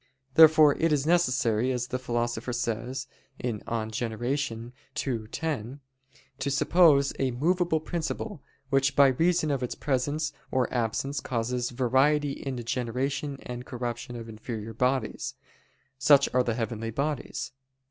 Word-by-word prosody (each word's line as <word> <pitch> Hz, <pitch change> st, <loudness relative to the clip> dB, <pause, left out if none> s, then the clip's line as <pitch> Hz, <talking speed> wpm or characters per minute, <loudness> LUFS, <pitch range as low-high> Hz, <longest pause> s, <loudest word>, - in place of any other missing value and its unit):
Therefore 155 Hz, -1 st, +8 dB
it 165 Hz, 0 st, +2 dB
is 145 Hz, -2 st, +2 dB
necessary, 130 Hz, -8 st, +2 dB
as 125 Hz, -1 st, -2 dB
the 125 Hz, -, -2 dB
Philosopher 120 Hz, -1 st, -2 dB
says 120 Hz, +3 st, -2 dB, 0.3 s
(De 120 Hz, -2 st, -1 dB
Gener. 110 Hz, +1 st, -4 dB, 0.8 s
ii, 115 Hz, -5 st, -3 dB
10), 140 Hz, -2 st, -4 dB, 0.6 s
to 135 Hz, +2 st, -1 dB
suppose 145 Hz, -1 st, +4 dB
a 135 Hz, -, +2 dB
movable 165 Hz, +6 st, +1 dB
principle, 170 Hz, +2 st, -4 dB, 0.3 s
which 135 Hz, -1 st, +2 dB
by 140 Hz, -1 st, +7 dB
reason 165 Hz, +3 st, +2 dB
of 135 Hz, -2 st, -1 dB
its 125 Hz, -, -3 dB
presence 145 Hz, +3 st, -1 dB, 0.2 s
or 130 Hz, -2 st, 0 dB
absence 125 Hz, +4 st, -1 dB
causes 120 Hz, 0 st, -2 dB
variety 135 Hz, +4 st, +2 dB
in 135 Hz, -1 st, -5 dB
the 120 Hz, -, -5 dB
generation 130 Hz, +4 st, -2 dB
and 125 Hz, +1 st, -7 dB
corruption 120 Hz, -1 st, -5 dB
of 115 Hz, -1 st, -7 dB
inferior 110 Hz, 0 st, -6 dB
bodies. 130 Hz, +4 st, -1 dB, 0.6 s
Such 140 Hz, 0 st, +6 dB
are 125 Hz, -, +4 dB
the 120 Hz, -2 st, -1 dB
heavenly 115 Hz, -1 st, -3 dB
bodies. 140 Hz, +6 st, -3 dB
130 Hz, 135 wpm, -27 LUFS, 120-145 Hz, 0.8 s, Therefore